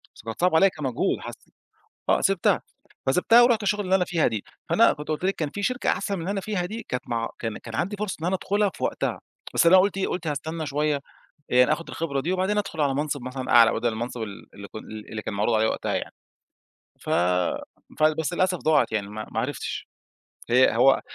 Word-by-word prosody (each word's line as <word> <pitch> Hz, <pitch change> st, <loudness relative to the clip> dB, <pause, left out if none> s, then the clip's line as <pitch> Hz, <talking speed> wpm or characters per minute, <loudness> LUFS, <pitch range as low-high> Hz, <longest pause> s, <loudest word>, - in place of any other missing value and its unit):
بس -, -, -13 dB
كانت 115 Hz, +5 st, -6 dB
صعبة 180 Hz, -2 st, +3 dB
عليّآ 195 Hz, +4 st, +6 dB
كمجهود 135 Hz, -8 st, -1 dB
حسّ -, -, -10 dB, 0.6 s
آه، -, -, +4 dB
سِبتها 195 Hz, -3 st, +2 dB, 0.5 s
فسِبتها 205 Hz, -, +5 dB
ورُحت 240 Hz, -3 st, +4 dB
الشغلة 205 Hz, +1 st, 0 dB
اللي 190 Hz, +1 st, +2 dB
أنا 180 Hz, -2 st, +2 dB
فيها 165 Hz, -3 st, +1 dB
دي. 110 Hz, -4 st, -3 dB, 0.3 s
فأنا -, -, +5 dB
كنت 150 Hz, -, -9 dB
قُلت 155 Hz, +2 st, -3 dB
لِك 195 Hz, -, +1 dB
كان 155 Hz, -3 st, -2 dB
فيه 205 Hz, -, -6 dB
شركة 250 Hz, +4 st, 0 dB
أحسن 200 Hz, -, 0 dB
من 185 Hz, -, -5 dB
اللي 185 Hz, +4 st, -2 dB
أنا 195 Hz, -, -2 dB
فيها 195 Hz, -3 st, -2 dB
دي، 220 Hz, +5 st, -6 dB
كانت 125 Hz, -, -4 dB
مع 115 Hz, -1 st, -1 dB
كان 110 Hz, -2 st, -3 dB
كان 115 Hz, -1 st, -8 dB
عندي 195 Hz, -, -1 dB
فرصة 210 Hz, -1 st, -3 dB
إن -, -, -2 dB
أنا 185 Hz, +2 st, +1 dB
أدخلها 205 Hz, +2 st, +1 dB
في -, -, -8 dB
وقتها. -, -, -1 dB, 0.3 s
بس -, -, +3 dB
أنا 185 Hz, +3 st, +8 dB
قُلت 195 Hz, +1 st, +3 dB
إيه 195 Hz, -, 0 dB
قُلت 175 Hz, -2 st, -3 dB
هاستنى 155 Hz, +2 st, -3 dB
شوية، 150 Hz, +1 st, 0 dB
آآ، 140 Hz, -, -5 dB, 0.6 s
يعني 125 Hz, +4 st, +6 dB
آخد 165 Hz, +2 st, -3 dB
الخبرة 140 Hz, -5 st, -2 dB
دي، 175 Hz, +6 st, -1 dB
وبعدين 190 Hz, +3 st, 0 dB
أدخل 170 Hz, -6 st, -3 dB
على 140 Hz, -2 st, +2 dB
منصب 145 Hz, -2 st, -2 dB
مثلًا 130 Hz, 0 st, -5 dB
أعلى 115 Hz, -1 st, +7 dB
بدل 120 Hz, +1 st, 0 dB
المنصب 115 Hz, +1 st, -4 dB
ال 100 Hz, -2 st, -8 dB
اللي 100 Hz, 0 st, -10 dB
ك -, -, -12 dB
اللي 110 Hz, 0 st, -9 dB
اللي 110 Hz, -1 st, -5 dB
كان -, -, -5 dB
معروض 105 Hz, +3 st, +1 dB
عليّا 110 Hz, 0 st, +3 dB
وقتها -, -, -2 dB
يعني. -, -, -4 dB, 0.9 s
ف -, -, -7 dB, 0.9 s
ف -, -, -1 dB, 0.2 s
بس 160 Hz, +2 st, -1 dB
للأسف 185 Hz, 0 st, +1 dB
ضاعت 155 Hz, -6 st, +2 dB
يعني، 100 Hz, -2 st, -1 dB
ما 110 Hz, +1 st, -6 dB
ما -, -, 0 dB
عرفتش. -, -, -4 dB, 0.6 s
هي 125 Hz, -1 st, +5 dB
هو 135 Hz, +3 st, +5 dB
155 Hz, 225 wpm, -25 LUFS, 120-190 Hz, 0.9 s, أنا